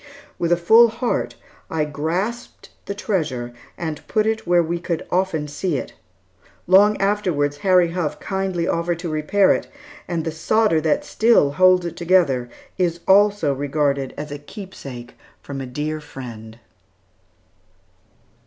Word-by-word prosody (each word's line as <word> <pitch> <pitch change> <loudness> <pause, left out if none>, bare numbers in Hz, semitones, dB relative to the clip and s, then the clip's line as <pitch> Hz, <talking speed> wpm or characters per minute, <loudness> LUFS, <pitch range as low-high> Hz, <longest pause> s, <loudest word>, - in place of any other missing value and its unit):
With 170 0 0
a 175 - +4
full 225 +7 +6
heart, 230 +2 -2 0.3
I 155 -2 0
grasped 175 +11 -4 0.2
the 200 - -4
treasure 145 - -2 0.2
and 160 -3 -5
put 215 -1 +1
it 220 0 -1
where 175 -1 +4
we 170 +1 -2
could 170 -1 -3
often 175 -5 0
see 150 +2 -2
it. - - -6 0.7
Long 205 +3 +5
afterwards, 180 -8 0
Harry 180 +1 +3
Huff 160 -4 -3
kindly 190 -3 -2
offered 170 0 -1
to 170 0 -5
repair 155 +6 +3
it; - - -3 0.4
and 170 -3 -2
the 160 - -1
solder 165 +1 +2
that 155 -1 0
still 220 -11 +3
holds 185 +3 +4
it 170 - -5
together 165 -9 +2 0.3
is 170 -2 0
also 200 -6 +4
regarded 140 -1 -1
as 150 0 -6
a 145 - -6
keepsake 140 - -10 0.3
from 135 -1 -7
a 130 - -6
dear 150 +4 -4
friend." 115 -6 -10
170 Hz, 145 wpm, -21 LUFS, 145-190 Hz, 0.7 s, full